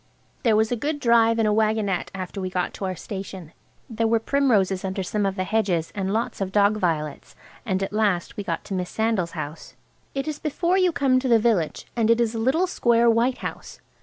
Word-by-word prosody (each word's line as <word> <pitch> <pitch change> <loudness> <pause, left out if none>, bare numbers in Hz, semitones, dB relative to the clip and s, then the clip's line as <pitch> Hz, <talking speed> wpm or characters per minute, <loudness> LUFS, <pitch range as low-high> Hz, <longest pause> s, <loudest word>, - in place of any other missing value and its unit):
There 225 -4 +3
was 220 +1 +2
a - - +2
good 290 +6 -2
drive 230 -2 +4
in 225 - +2
a 210 - +2
waggonette 215 -3 0
after 190 +1 -5
we 185 - -2
got 180 -1 -2
to 195 - -5
our 185 -1 -2
station. 190 -3 -7 0.3
There 225 -1 -1
were 230 +1 +3
primroses 220 -7 +1
under 190 0 -2
some 205 +2 -1
of 195 - -2
the 185 - -1
hedges, 185 -5 0
and 195 -1 -2
lots 225 -1 -2
of 190 -1 -2
dog 205 +1 +3
violets. 155 -6 -2 0.3
And 190 -1 0
at 195 - -4
last 205 -5 0
we 205 - -4
got 170 -4 -3
to 200 - -7
Miss 180 -1 -2
Sandal's 220 -6 -1
house. 150 +3 -7 0.4
It 275 +2 -2
is 300 -1 -3
before 340 +4 0
you 365 -1 +3
come 270 -4 +2
to 260 - -2
the 235 -2 +5
village, 215 -8 0
and 230 -2 +1
it 230 0 +4
is 235 -1 +1
a 225 - -3
little 270 +10 +2
square 235 -9 +3
white 240 +3 +1
house. - - -7
215 Hz, 220 wpm, -24 LUFS, 190-235 Hz, 0.4 s, the